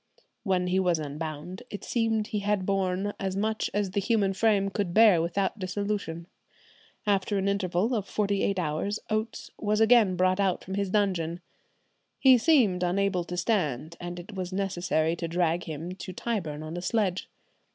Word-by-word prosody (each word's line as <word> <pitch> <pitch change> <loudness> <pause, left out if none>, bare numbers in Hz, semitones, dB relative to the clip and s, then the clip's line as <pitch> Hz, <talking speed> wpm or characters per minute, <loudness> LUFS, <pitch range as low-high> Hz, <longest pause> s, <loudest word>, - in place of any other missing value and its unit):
When 185 -3 +1
he 180 +1 +1
was 180 -3 +2
unbound 155 +3 -6
it 205 - -7
seemed 225 -2 0
he 210 - -2
had 200 -2 0
borne 195 +1 0
as 190 -1 -2
much 215 +2 -1
as 200 -2 -1
the 200 - 0
human 200 -1 +1
frame 200 -1 +2
could 190 -3 -2
bear 215 -6 +7
without 190 +5 -1
dissolution.... 190 -3 -3 0.8
After 200 0 +1
an 195 0 0
interval 200 +3 0
of 210 -4 -1
forty 200 -2 0
eight 195 - 0
hours 175 +5 -1
Oates 215 +1 -2
was 210 0 0
again 220 -4 +5
brought 185 +2 +2
out 190 -3 +1
from 190 - -7
his 200 0 -1
dungeon. 180 -5 0 0.8
He 260 -2 +6
seemed 230 - +3
unable 185 0 +1
to 180 +1 -5
stand, 170 - -1
and 175 0 -6
it 180 +5 -10
was 185 -1 -4
necessary 175 -4 0
to 170 - -3
drag 170 0 0
him 160 +2 -5
to 185 0 -7
Tyburn 170 -9 -3
on 155 +2 -6
a - - -4
sledge." 190 -2 -1
190 Hz, 170 wpm, -28 LUFS, 175-205 Hz, 0.8 s, bear